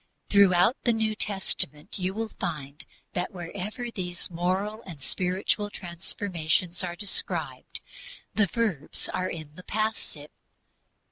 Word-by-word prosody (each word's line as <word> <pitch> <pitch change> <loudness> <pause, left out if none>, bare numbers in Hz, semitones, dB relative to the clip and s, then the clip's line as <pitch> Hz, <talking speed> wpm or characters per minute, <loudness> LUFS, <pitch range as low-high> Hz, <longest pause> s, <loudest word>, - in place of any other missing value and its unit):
Throughout 200 +3 +7
the 240 - +5
New 220 -1 +2
Testament 190 -7 0
you 185 +1 0
will 225 0 -1
find 150 -7 -4 0.3
that 180 - 0
wherever 200 +7 -4
these 180 -3 -2
moral 190 +6 0
and 170 -9 -8
spiritual 185 +7 +1
transformations 175 -1 0
are 175 -1 -2
described 200 +1 -2 0.5
the 205 -2 +4
verbs 205 - -1
are 185 0 0
in 155 -3 -6
the 185 - -11
passive. 215 -9 -2
185 Hz, 120 wpm, -29 LUFS, 170-210 Hz, 0.5 s, Throughout